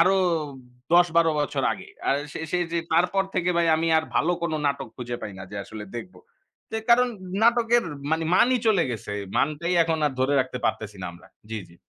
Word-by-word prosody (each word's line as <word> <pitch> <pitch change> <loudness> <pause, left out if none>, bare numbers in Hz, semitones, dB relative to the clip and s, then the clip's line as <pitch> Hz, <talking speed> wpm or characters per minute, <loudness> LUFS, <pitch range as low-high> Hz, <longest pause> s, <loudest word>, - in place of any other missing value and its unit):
আরো 195 +1 +5 0.8
১০-১২ 170 -2 +5
বছর 145 - -1
আগে। - - -9 0.2
আর 135 - +3 0.2
সে - - -5
সে 180 - +1
যে 170 - +1
তারপর 180 +4 +3
থেকে 180 -1 +1
ভাই 170 0 +3
আমি 165 +1 -1
আর 160 - -2
ভালো 175 - +2
কোন 170 -1 -1
নাটক 140 0 -1
খুঁজে 120 -1 -4
পাই 105 - -5
না - - -7
যে 105 - -7
আসলে 110 -1 -8
দেখবো। 180 +10 -8 0.5
যে 220 - 0
কারণ 250 +1 +6 0.4
নাটকের 235 0 +4 0.3
মানি 160 0 +1
মানই 255 +6 +5
চলে 200 -6 +4
গেছে। 110 -3 -5 0.2
মানটাই 155 +4 0
এখন 160 -1 0
আর 145 - -1
ধরে 130 +2 +2
রাখতে 125 -1 -3
পারতেছি 105 -2 -2
না - - -3
আমরা। 85 - -16 0.2
জি, 110 - -3
জি। 85 - -18
165 Hz, 195 wpm, -25 LUFS, 130-180 Hz, 0.8 s, কারণ